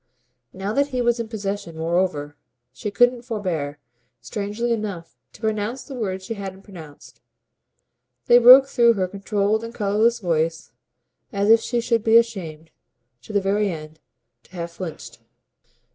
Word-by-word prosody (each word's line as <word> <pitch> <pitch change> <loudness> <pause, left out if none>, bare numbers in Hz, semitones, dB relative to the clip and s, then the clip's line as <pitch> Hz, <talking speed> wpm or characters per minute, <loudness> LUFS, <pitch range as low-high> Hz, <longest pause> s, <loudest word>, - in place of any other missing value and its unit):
Now 195 +3 -4
that 280 +2 +2
he 255 -3 -4
was 240 -1 +1
in 230 - -3
possession 200 -6 -5
moreover 160 -3 -1 0.4
she 210 - -5
couldn't 245 +4 +3
forbear, 180 - -3 0.4
strangely 205 - -3
enough, 200 -7 -5 0.2
to - - -17
pronounce 220 +3 -2
the 280 - -10
words 190 -6 -4
she 230 - -4
hadn't 195 -2 -8
pronounced: 160 -8 -13 1.0
they 240 - +7
broke 255 +3 +9
through 240 -4 +4
her 190 -4 -1
controlled 200 +3 -1
and 230 +1 -8
colourless 215 +3 +2
voice 165 - -1 0.6
as 200 +2 +2
if 225 - +7
she 240 +1 -2
should 230 -2 0
be 225 0 +6
ashamed, 165 -9 -2 0.5
to - - -11
the 205 -1 +1
very 200 +1 +1
end, 155 -2 -8 0.5
to - - -25
have 170 -1 -5
flinched. 160 - -8
205 Hz, 150 wpm, -22 LUFS, 175-230 Hz, 1.0 s, broke